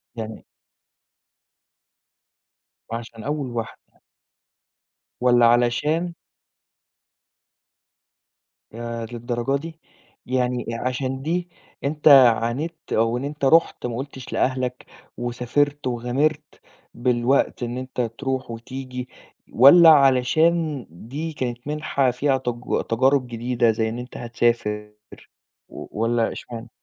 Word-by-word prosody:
يعني. - - -7 2.5
وعشان 115 -1 -7
أول 145 0 -2
واحدة. 115 -2 -7 1.3
والّا 120 -1 +5
علشان 135 +9 +2 2.6
ياه 115 0 -5
للدرجة 120 +2 -2
دي! 160 0 -9 0.5
يعني 125 -1 -1
عشان 130 +2 -3
دي، 175 +4 -2 0.3
أنت 150 +2 0
عانيت 130 +3 +5 0.2
أو 115 +2 +2
إن 125 - -5
أنت 145 0 -3
رُحت 165 0 +3
ما 120 -1 -3
قُلتش 130 -1 -7
لأهلك، 130 -1 -1 0.3
وسافرت 125 +4 -1
وغامرت، 135 +5 -1 0.3
بالوقت 125 +2 +1
إن 120 +1 -3
أنت 130 0 -4
تروح 130 +2 -3
وتيجي، 125 +2 -7 0.4
والّا 165 +7 +8
علشان 150 +1 +3
دي 135 - -6
كانت 125 -2 -4
منحة 145 -3 0
فيها 135 +2 +1
تج 120 -1 -2
تجارب 130 +3 +2
جديدة 120 0 +1
زي 110 0 -1
إن 115 +2 -5
أنت 125 +1 -8
هتسافر، 115 -3 -1 0.8
و - - -9 0.2
والّا 115 0 +1
إشمعنا؟ 115 0 -8
125 Hz, 100 wpm, -23 LUFS, 120-140 Hz, 2.6 s, والّا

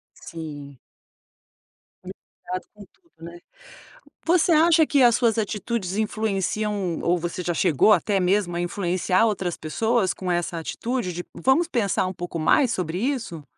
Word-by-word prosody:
Sim. 145 -4 -9 1.3
Preocupado 185 -1 -8
com 210 - -13
tudo, 340 -2 -34
né. 170 +1 -9 0.9
Você 345 0 +3
acha 325 0 +5
que 285 -2 +2
as 240 -2 +6
suas 235 -2 +2
atitudes 210 -2 -2
influenciam 210 -3 -1
ou 175 +1 +1
você 175 +2 -4
já 175 - -1
chegou 165 +6 +4
até 200 +1 +1
mesmo 185 -1 +1
a - - -2
influenciar 180 +2 0
outras 190 -5 -2
pessoas 220 +5 0
com 185 -1 -4
essa 175 0 -1
atitude 225 +3 -3
de: 175 +1 -6
"Vamos 300 +6 +2
pensar 205 - 0
um 185 - -4
pouco 175 -2 -6
mais 240 - +3
sobre 180 -3 -2
isso?". 230 - -3
190 Hz, 145 wpm, -24 LUFS, 175-230 Hz, 1.3 s, as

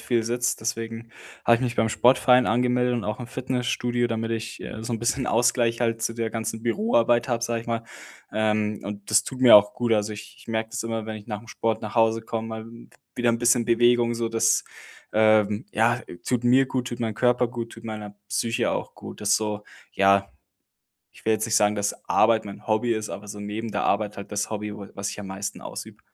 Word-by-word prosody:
viel 120 -2 0
sitze. 120 +2 0
Deswegen 115 +1 -4 0.3
habe 120 - +6
ich - - -7
mich 120 -1 -1
beim 110 +1 +2
Sportverein 125 +2 +4
angemeldet 125 +2 +2
und 120 -3 -2
auch 105 +3 -3
im 125 - -6
Fitnessstudio, 125 -1 -1
damit 115 0 -2
ich, 115 -1 -4
äh, 110 - -7
so 115 +1 -4
'n 115 - -1
bisschen 125 +2 0
Ausgleich 120 0 +2
halt 115 -1 0
zu 115 - 0
der 115 -1 -2
ganzen 110 0 -4
Büroarbeit 120 - +2
habe, 120 -1 0
sage 115 -1 -1
ich - - -18
mal. 115 -1 -1 0.5
Ähm, 105 -1 0
und 100 +1 -7
das 110 - +5
tut 130 -1 -7
mir 125 -4 +10
auch 105 0 +4
gut. 120 -2 0
Also 105 0 +1
ich 105 0 -10
ich - - -17
merke 110 -1 -2
das 120 -1 -3
immer, 115 -1 -3
wenn 110 0 -5
ich 105 - -12
nach'm 110 0 -6
Sport 110 0 -2
nach 110 - -6
Hause 115 0 +3
komme, 115 0 -4
mal 110 0 -6 0.5
wieder 120 -1 +3
'n 115 - 0
bisschen 120 0 +3
Bewegung, 120 0 +3
so 115 -1 -1
das, 115 0 +2 0.5
ähm, 110 -1 +3
ja, 120 +2 +2 0.3
tut 125 -1 0
mir 130 +2 +5
gut, 130 -2 -2
tut 120 - -6
meinem 110 -2 -1
Körper 125 +1 +2
gut, 115 -1 -6
tut 115 - -12
meiner 105 -2 -6
Psyche 115 0 0
auch - - -4
gut. - - -10
Das 105 -1 +3
so 105 -1 -3 0.3
ja, 100 0 +3 0.8
ich - - -18
will 110 - +3
jetzt 110 +1 0
nicht 110 -1 +2
sagen, 105 0 +3
dass 105 0 -2
Arbeit 110 0 +4
mein 100 -1 -10
Hobby 110 +2 +1
ist, 110 -1 -3
aber 105 - -7
so 105 - -7
neben 110 +2 -4
der - - -1
Arbeit 105 0 0
halt 100 - -8
das 105 0 -2
Hobby, 105 -1 -4
wo 100 -2 -8
was 100 0 -3
ich - - -8
am 100 - -7
meisten 100 +1 -5
ausübe. - - -8
115 Hz, 225 wpm, -25 LUFS, 110-120 Hz, 0.8 s, mir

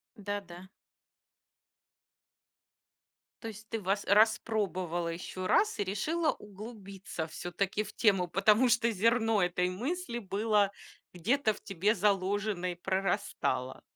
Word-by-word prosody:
Да-да. 200 -4 -6 2.7
То 225 - -6
есть 215 0 -9
ты 225 - -2
воc 200 +1 0
распробовала 200 -5 +2
еще 180 +2 -4
раз 420 - +3
и - - +2
решила 305 - 0
углубиться 200 -4 -8
все-таки 180 +5 -2
в 215 - -9
тему, 195 -5 +3
потому 210 +7 +4
что 235 0 +3
зерно 225 +1 +2
этой 180 0 +1
мысли 245 - -3
было 205 0 +1 0.4
где-то 215 +6 +1
в - - -14
тебе 200 +4 +1
заложено 195 -1 0
и - - -13
прорастало. 190 -8 -1
200 Hz, 110 wpm, -31 LUFS, 185-220 Hz, 2.7 s, потому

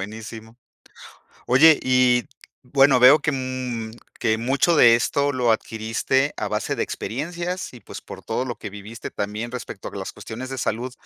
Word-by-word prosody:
Buenísimo. 110 +2 -8 0.9
Oye, 150 +5 +6
y 125 -1 +3 0.4
bueno, 135 0 +4
veo 130 +5 +8
que, 150 - -1
mm, 130 -4 -4 0.3
que 110 0 +1
mucho 135 +8 +2
de 120 -6 +7
esto 140 +4 0
lo 125 -4 +1
adquiriste 115 +5 -1
a - - -2
base - - -2
de - - -3
experiencias 170 - -4
y 125 - -11
pues - - -10
por - - -11
todo 115 +3 -1
lo 120 -2 -4
que 100 - -8
viviste 105 +2 -9
también 105 +4 -4
respecto 125 -2 -7
a - - -13
las - - -5
cuestiones 125 +4 -8
de 135 - -5
salud, 120 +1 -2
125 Hz, 170 wpm, -23 LUFS, 110-135 Hz, 0.9 s, veo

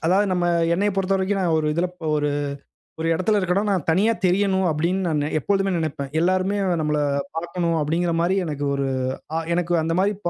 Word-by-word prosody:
அதாவது 195 +4 +3
நம்ம 180 -1 0 0.3
என்னையப் 200 +2 0
பொறுத்தவரைக்கும் 195 +1 0
நான் 170 -3 +1
ஒரு 155 - -1
இதில 170 +3 +1
ப - - -14
ஒரு 150 0 0 0.7
ஒரு 165 - -1
இடத்தில 195 +5 +1
இருக்கேன்னா, 185 +1 +1
நான் 185 -6 0
தனியா 195 +8 +3
தெரியணும், 190 +1 +2
அப்படின்னு 170 +5 0
நானு 150 -1 0
எப்பொழுதுமே 195 +4 0
நெனைப்பேன். 140 -4 -3
எல்லோருமே 185 +3 +1 0.2
நம்மள 150 -1 0 0.4
பாக்கனும் 170 0 -1
அப்படிங்குற 170 +3 0
மாரி 180 +3 +2
எனக்கு 145 -3 -4
ஒரு 140 -1 -1 0.5
அ - - +1 0.2
எனக்கு 175 0 0
அந்த 165 +1 -1
மாரி 200 +2 +2
ப - - +2
175 Hz, 180 wpm, -23 LUFS, 160-190 Hz, 0.7 s, அதாவது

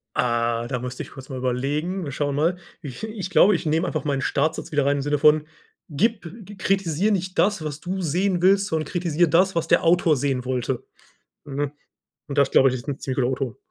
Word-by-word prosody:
Ah, 120 -1 0
da 125 -1 -3
müsste 125 +1 -5
ich - - -13
kurz 135 -1 -11
mal 130 - -5
überlegen. 145 +9 -2
Wir 145 - -5
schauen 145 +1 -2
mal. 165 +5 +1 0.2
Ich 145 - -8
ich 215 -4 -5
glaube, 200 +1 +5
ich 170 - -4
nehme 160 +3 +1
einfach 155 - -2
meinen 140 -2 -1
Startsatz 155 +5 -1
wieder 145 -2 +1
rein 140 0 +2
im - - -1
Sinne 145 +1 0
von: 150 0 +4 0.4
„Gib 200 +7 0 0.3
kritisiere 195 +1 +1
nicht 185 -1 -2
das, 205 -4 +2
was 150 -1 -5
du 185 +3 -4
sehen 180 +2 0
willst, 195 +2 +4
sondern 160 -5 -1
kritisiere 175 -1 +1
das, 185 +4 +3
was 165 -1 -1
der - - +4
Autor 165 -2 +3
sehen 130 -1 -1
wollte.“ 125 0 -2 0.6
Hm, 145 0 -3 0.6
und 145 0 -4
das 140 -1 +4
glaube 135 -1 +5
ich, - - -3
ist 120 +1 -7
'n 140 -1 -3
ziemlich 130 -1 -4
guter 120 - +2
O-Ton. 130 -4 -3
150 Hz, 215 wpm, -23 LUFS, 135-180 Hz, 0.6 s, glaube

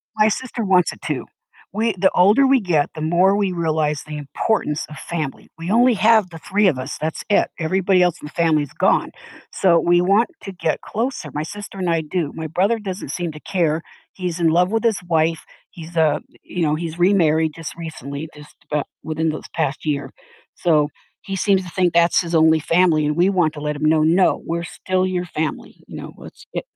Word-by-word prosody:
My 215 0 +4
sister 235 +2 -2
wants 185 -3 +3
it - - -13
too. - - -3 0.5
We 220 +2 0
the 190 +1 +3
older 205 +10 +5
we 270 0 +4
get, 170 -9 +1
the 155 - -6
more 175 +5 +3
we 200 -3 0
realize 155 -3 0
the 150 -1 -6
importance 150 - -1
of 155 - -10
family. 155 -5 -5
We 165 +4 -4
only 245 +2 +5
have 220 -2 +4
the 165 - -10
3 200 +5 +1
of 145 - +2
us; 130 +2 -5
that's 155 +1 -3
it. 205 - +3
Everybody 185 +3 +2
else 180 0 0
in - - -8
the 150 - -9
family 160 -3 +2
is 145 - -10
gone. - - +2 0.4
So, 170 -3 +4
we 175 +1 +3
want 200 - +3
to 195 - -6
get 165 -4 -2
closer; 230 - -3
my 150 - -2
sister 200 +4 -8
and 185 -2 -1
I 165 -1 +2
do. 155 0 -3
My 160 -1 -4
brother 190 +9 +1
doesn't 195 -3 -6
seem 175 -2 -3
to 150 - -11
care. 165 -2 0 0.3
He's 180 -3 -4
in 170 -2 +3
love 180 +3 +3
with 225 +2 -1
his 225 -3 +2
wife, 165 -1 +1 0.2
he's, 165 0 -11
uh 160 -3 +3 0.2
you 180 - -5
know, 150 -2 +2
he's 165 +1 -5
remarried 160 -4 +3
just 165 -2 -7
recently, 155 -2 -6
just 150 0 -14
abou 150 -1 0 0.2
within 160 +1 -1
this 155 - -5
past 150 -2 -2
year. 140 -3 -2 0.4
So, 150 -4 +2 0.3
he 195 0 -5
seems 190 0 +2
to 180 - -9
think 175 0 +1
that's 170 0 +4
his 170 -1 -2
only 160 0 +5
family, 165 -1 +3
and 150 0 0
we 175 +3 +3
want 175 -5 +1
to 150 - -8
let 150 0 -2
him 155 - -2
know, 155 0 +4
"No, 175 +4 +3
we're 170 +1 -3
still 185 +2 -1
your 180 -1 -2
family," 160 -2 -5
you - - -10
know? - - -7
"Let's - - -13
i - - -1
170 Hz, 215 wpm, -21 LUFS, 155-190 Hz, 0.5 s, older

